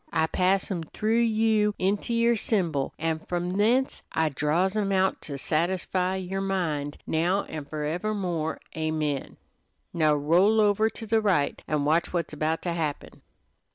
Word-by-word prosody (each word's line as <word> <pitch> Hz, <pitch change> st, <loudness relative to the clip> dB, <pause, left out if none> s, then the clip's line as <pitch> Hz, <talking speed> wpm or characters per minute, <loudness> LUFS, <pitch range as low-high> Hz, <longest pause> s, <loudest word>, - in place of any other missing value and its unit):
I 160 Hz, -1 st, +2 dB
pass 190 Hz, +4 st, +1 dB
'em 175 Hz, -3 st, -2 dB
through 215 Hz, +8 st, 0 dB
you 220 Hz, -2 st, +2 dB
into 200 Hz, +4 st, 0 dB
yer 235 Hz, 0 st, +3 dB
symbol, 170 Hz, -, 0 dB
an' 160 Hz, 0 st, -1 dB
from 175 Hz, +2 st, -3 dB
thence 230 Hz, +7 st, +1 dB
I 160 Hz, -1 st, +1 dB
draws 155 Hz, +8 st, 0 dB
'em 205 Hz, -2 st, 0 dB
out 190 Hz, 0 st, +1 dB
to 140 Hz, -2 st, -5 dB
satisfy 180 Hz, +5 st, 0 dB
yer 190 Hz, +1 st, -3 dB
mind 165 Hz, -7 st, -2 dB
now 175 Hz, +5 st, +1 dB
and 150 Hz, -2 st, -7 dB
forever 160 Hz, +8 st, -2 dB
more, 170 Hz, -5 st, -2 dB, 0.2 s
amen. 155 Hz, -3 st, -2 dB, 0.6 s
Now 155 Hz, -3 st, +3 dB
roll 175 Hz, +9 st, +3 dB
over 215 Hz, +1 st, +3 dB
to 225 Hz, -, -7 dB
the 220 Hz, 0 st, +2 dB
right 185 Hz, -9 st, +1 dB
an' 150 Hz, -2 st, 0 dB
watch 160 Hz, +4 st, +1 dB
what's 170 Hz, -3 st, -2 dB
about 155 Hz, +2 st, -1 dB
to 175 Hz, -, -1 dB
happen." 155 Hz, -4 st, -4 dB
180 Hz, 155 wpm, -26 LUFS, 155-205 Hz, 0.6 s, yer